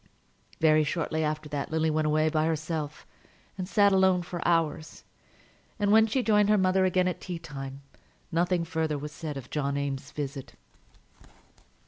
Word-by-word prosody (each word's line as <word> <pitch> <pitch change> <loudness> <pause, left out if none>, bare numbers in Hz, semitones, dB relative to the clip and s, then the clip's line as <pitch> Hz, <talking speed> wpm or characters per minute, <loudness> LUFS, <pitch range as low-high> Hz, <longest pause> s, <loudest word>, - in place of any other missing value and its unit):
Very 155 -1 +4
shortly 160 +1 -1
after 155 0 -2
that 145 -1 -3
Lily 160 0 +1
went 155 0 +1
away 155 +1 +2
by 155 0 +1
herself, 155 -1 -3 0.5
and 185 -1 -5
sat 200 -1 +4
alone 190 -2 +3
for 175 0 -6
hours; 160 -2 0 0.7
and 205 -2 +1
when 220 +1 +6
she 250 +3 0
joined 210 -2 +3
her 210 - +5
mother 185 0 +3
again 185 0 +2
at 180 - -3
tea 180 -2 -5
time, 135 -4 -8 0.5
nothing 175 +1 +1
further 160 -2 -1
was 150 +1 -6
said 150 -2 -6
of 125 -2 -9
John 140 -2 -1
Eames's 140 -1 -3
visit. 140 -2 -6
160 Hz, 160 wpm, -28 LUFS, 150-185 Hz, 0.7 s, when